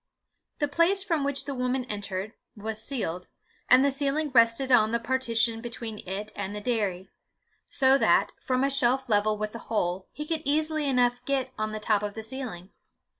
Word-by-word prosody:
The 290 - 0
place 335 +6 +2
from 330 -7 0
which 280 0 -1
the 280 - -3
woman 250 0 -1
entered, 205 -1 -4 0.2
was 215 +1 -4
ceiled, 180 -9 -3 0.4
and 255 +2 +7
the 280 - +3
ceiling 285 +2 -1
rested 230 +2 +4
on 220 -3 +6
the 235 - +1
partition 230 -2 0
between 230 -2 -6
it 205 +3 -4
and 200 0 -4
the - - -3
dairy; 205 -5 -1 0.6
so 265 +1 +3
that, - - +3
from 255 -1 +1
a 275 - +2
shelf 260 -1 +1
level 210 0 +2
with 215 0 -3
the 230 - -7
hole, 185 -4 -1
he 300 - -6
could 320 0 -2
easily 310 +1 0
enough 245 -2 +2
get 265 -1 -1
on 215 0 -2
the 215 - -4
top 210 -1 +1
of 205 -1 -4
the 220 - -5
ceiling. 220 -6 -6
240 Hz, 185 wpm, -27 LUFS, 215-275 Hz, 0.6 s, and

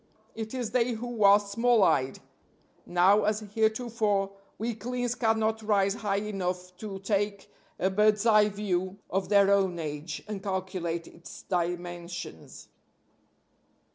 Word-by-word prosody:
It 220 +2 -6
is 245 -4 -3
they 245 -1 +2
who 230 -1 -3
are 200 +1 +8
small 230 +2 +2
eyed. 130 -6 +2 0.7
Now, 190 +4 +4
as 215 +1 +1
heretofore, 220 -1 0 0.3
weaklings 240 +2 -2
cannot 220 -2 +1
rise 200 -2 +2
high 205 -2 -2
enough 180 -3 -4
to 205 -2 -6
take 200 0 -2 0.3
a 190 - +1
bird's 210 +2 +3
eye 215 -2 +5
view 190 -2 -2
of 190 0 -1
their 200 -1 +5
own 190 -3 +2
age, 150 0 -5
and 210 -2 -5
calculate 185 -4 -3
its 170 +1 -12
dimensions. 175 - -4
200 Hz, 125 wpm, -28 LUFS, 185-220 Hz, 0.7 s, are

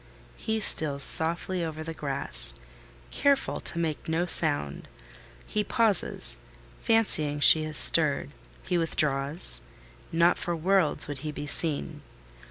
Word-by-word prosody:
He 220 -1 -5
steals 145 -8 +2
softly 170 +2 -2
over 155 -1 -8
the 165 +1 -9
grass, - - -2 0.6
careful 280 -1 -2
to - - -7
make 160 -2 -6
no 165 +2 -3
sound; 145 - +5 0.6
he 210 - -4
pauses—fancying 155 - -2
she 155 +2 +6
has 155 -1 +4
stirred: 150 -3 +5 0.3
he 180 -2 -3
withdraws: 140 - -2 0.5
not 170 +1 0
for 175 - -5
worlds 180 0 0
would 145 -2 -8
he 150 +2 -8
be 145 - -9
seen. 150 +1 -4
155 Hz, 120 wpm, -24 LUFS, 145-175 Hz, 0.6 s, she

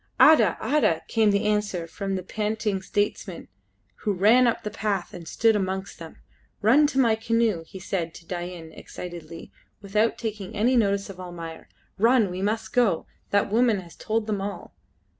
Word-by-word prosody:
"Ada! 230 - +6
Ada!" 220 - +1
came 220 -2 +3
the 200 +1 +1
answer 210 -5 0
from 195 +3 -4
the 185 - -4
panting 210 0 -2
statesman 195 -2 -3 0.5
who 210 - -1
ran 220 +7 +5
up 235 - 0
the 210 - -4
path 205 -4 -2
and 170 -2 -9
stood 225 +6 +2
amongst 190 -1 -3
them. 165 -1 -10 0.5
"Run 275 +8 +6
to 270 - -4
my 235 -4 +4
canoe," 225 -5 0
he - - -10
said 175 -3 -3
to 170 - -12
Dain 175 -2 -6
excitedly, 170 -1 -9 0.3
without 210 +3 0
taking 215 -4 -5
any 235 +5 +2
notice 200 -3 +1
of 185 - -13
Almayer. 170 -3 -8 0.3
"Run! 230 -3 +4
we 180 +1 -4
must 215 +6 -2
go. 235 - +2 0.2
That 200 0 +1
woman 230 -2 +3
has 170 -2 -14
told 220 0 -2
them 210 -2 -2
all!" 200 +1 -6
205 Hz, 170 wpm, -25 LUFS, 180-225 Hz, 0.5 s, Ada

